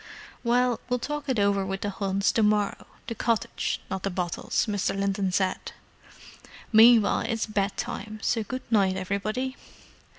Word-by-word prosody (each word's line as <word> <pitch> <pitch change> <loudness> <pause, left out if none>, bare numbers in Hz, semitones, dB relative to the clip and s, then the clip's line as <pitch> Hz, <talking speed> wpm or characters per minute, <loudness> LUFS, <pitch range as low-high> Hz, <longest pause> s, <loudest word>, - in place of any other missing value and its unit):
"Well, 245 0 +2
we'll 250 - +2
talk 290 +3 -4
it 260 - +1
over 200 -1 +2
with 195 0 -4
the 205 - -2
Hunts 195 0 0
to 225 - +1
morrow—the 210 +2 -1
cottage, 230 +1 -1
not 190 0 -4
the 195 - -1
bottles," 180 -2 -1
Mr. 200 -2 -1
Linton 195 -1 0
said. 185 0 -1 1.0
"Meanwhile, 225 -1 +6
it's 225 -2 -1
bed 205 -2 -1
time, 220 -3 -5
so 230 -2 +1
good 255 +4 -5
night, 195 -4 +3
everybody." 215 +7 -2
210 Hz, 145 wpm, -26 LUFS, 195-235 Hz, 1.0 s, Meanwhile